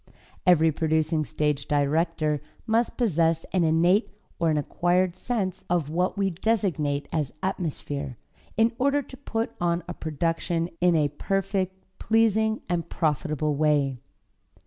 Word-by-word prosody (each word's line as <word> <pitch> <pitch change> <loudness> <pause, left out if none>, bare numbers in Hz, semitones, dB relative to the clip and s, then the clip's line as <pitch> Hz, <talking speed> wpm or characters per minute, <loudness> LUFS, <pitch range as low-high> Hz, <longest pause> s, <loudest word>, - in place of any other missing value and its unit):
Every 165 -2 +6
producing 155 0 +1
stage 145 +2 -1
director 150 +1 +1 0.2
must 230 +2 +1
possess 165 -8 +2
an 185 -2 +3
innate 170 +6 +3 0.3
or 165 -1 +2
an 155 - +2
acquired 175 +4 +1
sense 195 -7 -2
of 165 -4 0
what 180 +4 0
we 195 -1 +1
designate 170 -8 0
as 150 -4 -1
atmosphere, 145 - -3 0.4
in 225 +1 +4
order 280 +2 +2
to 260 - -12
put 225 -2 -3
on 170 0 +1
a 175 - -4
production 165 +2 -1
in 175 -1 +4
a 150 -2 +3
perfect, 190 +4 -1 0.2
pleasing 220 0 +2
and 175 -2 -2
profitable 155 -1 0
way. 145 -3 +1
170 Hz, 130 wpm, -26 LUFS, 150-190 Hz, 0.4 s, Every